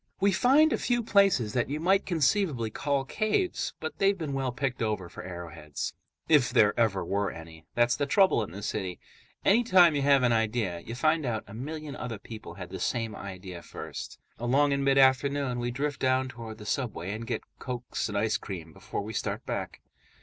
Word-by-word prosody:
We 200 +1 +4
find 275 - +5
a - - 0
few 240 -1 +1
places 195 - +3
that 120 0 0
you 150 +2 -2
might 190 +4 +2
conceivably 155 - +1
call 140 +3 -1
caves, 215 - -1
but 155 - -6
they've 195 0 +3
been 155 -5 -4
well 135 -2 -1
picked 130 0 -2
over 105 -6 -1
for - - -9
arrowheads, 85 -5 -6 0.3
if 150 -6 +5
there 110 -4 +4
ever 105 -6 +1
were 100 +2 0
any. 80 -1 -11
That's 120 0 +3
the 145 - -1
trouble 190 - +4
in 105 - -4
the 100 +4 -8
city: 95 -4 -3 0.5
anytime 190 -6 +6
you 140 - +1
have 140 -1 +4
an 125 - +4
idea, 110 -5 0
you 115 +7 -7
find 155 +4 +2
out 115 -4 -2
a 100 - -12
million 150 +4 -6
other 120 -3 -5
people 110 +2 -9
had - - -8
the - - -5
same 115 -2 -1
idea 95 -2 -8
first. - - -8 0.2
Along 135 +5 +3
in 140 0 +1
mid 135 0 +3
afternoon, 135 -1 +3
we 120 0 -1
drift 140 +3 -2
down 130 0 +2
toward 115 -3 -8
the 105 - -10
subway 105 -6 -2
and 110 +2 -5
get - - -2 0.2
cokes 125 -3 -4
and 105 - -2
ice 110 +1 +1
cream 85 -5 -7
before - - -5
we 110 +2 -6
start - - -3
back. - - -4
125 Hz, 200 wpm, -28 LUFS, 105-145 Hz, 0.5 s, anytime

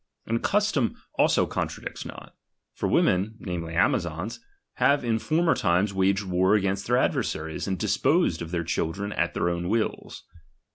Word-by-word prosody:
And 115 +1 -1
custom 205 - +1 0.2
also - - +4
contradicts - - -4
not; - - -10 0.4
for - - -2
women, 100 +5 +2
namely 85 -4 -5
Amazons, 85 +3 0 0.4
have 140 -2 +3
in 115 -1 +1
former 165 +6 +2
times 95 -2 +1
waged 95 +1 +2
war 95 +2 +2
against 100 -1 0
their 125 +1 +3
adversaries, 80 -10 -1
and 95 -1 -1
disposed - - +1
of 85 - -5
their 85 -1 -2
children 95 +4 -2
at 85 - -1
their 85 - 0
own 85 0 -1
wills. 110 +1 -2
95 Hz, 150 wpm, -26 LUFS, 85-115 Hz, 0.4 s, also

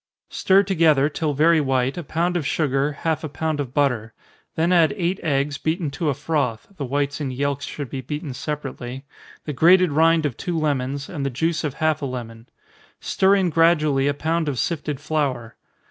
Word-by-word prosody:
_ - - -19
Stir 195 +1 +4
together, 160 -7 +3
till 155 -1 -2
very 160 +2 +4
white, 130 -1 0
a 175 - -4
pound 170 +4 -1
of 175 - 0
sugar, 140 0 0
half 160 +2 -2
a 155 - -4
pound 155 +1 -2
of 135 -4 -3
butter 125 -6 0 0.4
then 165 +2 +1
add 170 +2 +4
eight 180 0 -1
eggs, 145 -1 -1
beaten 160 -2 -1
to 150 +3 -2
a 140 - 0
froth, 140 -6 -2
(the 145 -6 -4
whites 140 +3 -2
and 135 -3 -2
yelks 140 +2 -2
should 145 -2 -6
be 130 +2 -5
beaten 150 0 -5
separately,) 135 -2 -6 0.4
the 150 - -3
grated 180 +4 +5
rind 160 +1 +3
of 140 -5 -2
two 175 -3 -3
lemons, 140 -2 -1
and 150 -6 -5
the 140 - 0
juice 160 +6 -1
of 145 -3 -3
half 155 -1 0
a 140 - -2
lemon. 115 -2 -7 0.5
Stir 195 +1 +2
in 185 -3 +1
gradually 155 -4 +3
a 145 - +2
pound 160 +1 -1
of 135 - -3
sifted 150 +1 -2
flour. 140 -7 -2
150 Hz, 195 wpm, -22 LUFS, 135-165 Hz, 0.5 s, grated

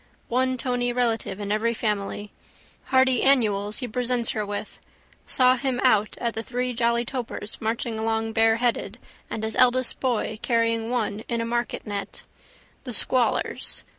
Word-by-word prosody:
One 255 +1 +1
tony 245 0 0
relative 230 -5 0
in 205 -1 -3
every 230 +2 +1
family. 205 -1 -2 0.5
Hardy 260 -2 +3
annuals 215 -5 +2
he 250 - -2
presents 245 0 0
her 215 - -2
with. 205 0 -5 0.5
Saw 255 0 +4
him 260 -1 -1
out 215 -5 +3
at 235 -1 -1
the 225 - -3
Three 250 +1 -2
Jolly 235 0 +1
Topers 235 -4 -5
marching 225 0 -2
along 225 0 -1
bareheaded 225 +2 +2 0.3
and 220 - -4
his 220 0 -2
eldest 255 0 +4
boy 230 -4 -1
carrying 230 -1 +1
one 220 -4 -1
in 235 - 0
a 230 - -1
marketnet. 230 -3 -3 0.6
The 250 - -5
squallers. 245 +3 +1
235 Hz, 145 wpm, -25 LUFS, 220-250 Hz, 0.6 s, Saw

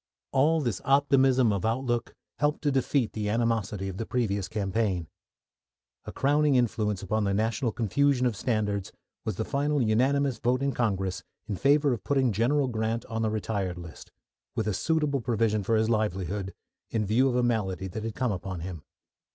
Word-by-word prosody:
All 155 +4 +3
this 120 -9 -2
optimism 135 -4 +4
of 100 -2 -2
outlook 120 +1 -1 0.2
helped 150 +2 0
to 145 - +2
defeat 135 -2 +1
the 105 -1 -2
animosity 110 -3 0
of 95 -1 -5
the 115 - -3
previous 100 -6 -1
campaign. 100 -4 -1 1.0
A - - -6
crowning 145 +1 +2
influence 110 -5 0
upon 110 +3 0
the 100 -1 +1
national 115 +3 0
confusion 125 +4 +1
of 120 -3 +1
standards 105 -3 -1 0.3
was 110 - -2
the 110 - -2
final 145 +1 0
unanimous 130 +4 +2
vote 125 +2 +1
in 140 - +1
Congress 95 -7 -1 0.2
in 105 - -3
favour 140 - +3
of 115 - -5
putting 135 -4 +2
General 130 +7 +2
Grant 115 -1 -2
on 110 0 -3
the 110 - +1
retired 100 -4 -2
list, 85 -3 -10 0.4
with 110 - -1
a 105 - +1
suitable 145 - 0
provision 115 -3 +1
for 115 +3 +1
his 110 0 +2
livelihood, 100 -3 -1 0.3
in 110 -2 -1
view 120 +7 +3
of 125 - -1
a 125 - +2
malady 100 -6 0
that 105 +4 -6
had 115 -1 -4
come 125 -3 0
upon 95 -2 -4
him. 85 -2 -6
115 Hz, 175 wpm, -28 LUFS, 100-130 Hz, 1.0 s, optimism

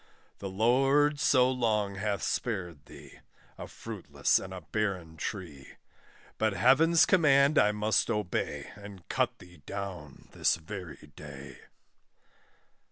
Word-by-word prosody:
The 100 - -5
Lord 135 +8 +2
so 130 -4 +4
long 110 -5 0
hath 100 +1 -2
spared 90 - -3
thee, - - -14 0.4
A - - -6
fruitless - - -1
and 95 - -8
a 95 -1 -7
barren 90 -2 -3
tree; 80 -6 -7 0.7
But 110 -2 +1
Heaven's 145 - +5
command 145 -4 +4
I 105 - +4
must 105 +2 +1
obey, 90 -9 -3
And 100 -3 -12
cut - - 0
thee 90 0 -16
down 90 -8 -7
this - - +2
very 85 -2 -9
day. 70 -2 -10
100 Hz, 120 wpm, -29 LUFS, 90-125 Hz, 0.7 s, Heaven's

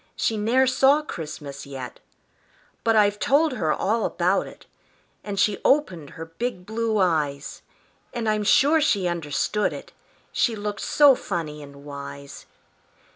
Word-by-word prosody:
She 225 - 0
ne'er 230 +5 +2
saw 270 +3 +3
Christmas 145 - -7
yet; 130 -3 -8 0.8
But 225 -1 +2
I've 205 -1 +3
told 300 +3 +3
her 160 -10 -1
all 220 +6 0
about 185 +3 0
it, - - -14 0.6
And 200 -2 -4
she 205 0 +2
opened 185 - +1
her 165 - -6
big 180 +3 -5
blue 220 +1 -1
eyes, 150 -7 -1 0.5
And 235 -2 -4
I'm 215 -1 +1
sure 290 +9 +4
she 200 -11 +1
understood 175 +5 -1
it - - -9 0.4
She 235 - +1
looked 205 -1 -4
so 290 -2 +5
funny 155 -10 -4
and 140 0 -13
wise. 140 -1 -9
205 Hz, 140 wpm, -24 LUFS, 155-230 Hz, 0.8 s, so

